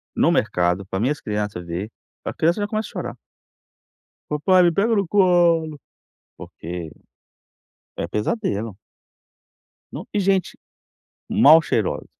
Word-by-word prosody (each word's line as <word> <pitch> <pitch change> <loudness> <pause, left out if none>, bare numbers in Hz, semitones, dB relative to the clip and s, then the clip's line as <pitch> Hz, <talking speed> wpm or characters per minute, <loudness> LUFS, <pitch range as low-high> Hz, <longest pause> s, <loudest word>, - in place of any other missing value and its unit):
No - - +3
mercado 90 +2 0
pra 95 0 -4
minhas 140 +6 -1
criança 105 -3 -3
ver. 85 +5 -5 0.4
A - - -3
criança 170 +5 +1
já 205 - -1
começa 215 0 -3
a - - -15
chorar - - -6 1.1
"papai, 180 +5 +3
me 170 - +4
pega 225 +5 +1
no 200 -4 0
colo", 170 -5 +3 0.6
porque 85 -1 -8 1.1
é 85 - -3
pesadelo. 105 - -2 1.2
Não, - - -7
e 205 - +1
gente, 190 -2 0 0.7
mal 155 +3 +7
cheirosa. 110 -8 -1
150 Hz, 125 wpm, -22 LUFS, -, 1.2 s, mal